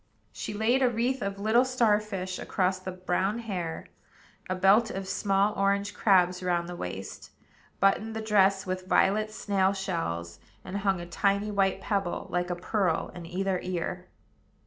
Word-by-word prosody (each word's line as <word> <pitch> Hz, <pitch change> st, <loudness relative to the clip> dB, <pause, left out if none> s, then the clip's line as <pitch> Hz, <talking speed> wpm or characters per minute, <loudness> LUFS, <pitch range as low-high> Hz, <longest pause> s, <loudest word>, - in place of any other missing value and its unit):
She 210 Hz, -, -5 dB
laid 235 Hz, +5 st, +2 dB
a 255 Hz, -, +4 dB
wreath 245 Hz, +3 st, -1 dB
of 200 Hz, 0 st, -3 dB
little 220 Hz, +4 st, +4 dB
star 240 Hz, -5 st, +3 dB
fish 190 Hz, -3 st, -5 dB
across 185 Hz, 0 st, 0 dB
the 185 Hz, 0 st, -6 dB
brown 185 Hz, +3 st, -1 dB
hair, 185 Hz, -8 st, -4 dB, 0.6 s
a 185 Hz, -, 0 dB
belt 195 Hz, +5 st, +4 dB
of 195 Hz, 0 st, -5 dB
small 200 Hz, +1 st, +1 dB
orange 200 Hz, +1 st, 0 dB
crabs 180 Hz, -3 st, +3 dB
round 175 Hz, -2 st, 0 dB
the 175 Hz, -, -6 dB
waist, 95 Hz, -, -7 dB, 0.5 s
buttoned 215 Hz, +3 st, +2 dB
the -, -, -2 dB
dress 200 Hz, -2 st, +3 dB
with 185 Hz, 0 st, -4 dB
violet 215 Hz, +3 st, +3 dB
snail 200 Hz, -3 st, +1 dB
shells, 85 Hz, -, -3 dB, 0.3 s
and 190 Hz, +2 st, -4 dB
hung 195 Hz, -2 st, +1 dB
a 175 Hz, -, -6 dB
tiny 200 Hz, +4 st, 0 dB
white 195 Hz, -2 st, +1 dB
pebble, 195 Hz, -4 st, -2 dB
like 175 Hz, 0 st, -1 dB
a 175 Hz, -, -1 dB
pearl, 180 Hz, -1 st, -1 dB
in 175 Hz, -2 st, -8 dB
either 185 Hz, +1 st, -1 dB
ear. 180 Hz, 0 st, -4 dB
195 Hz, 165 wpm, -28 LUFS, 180-210 Hz, 0.6 s, a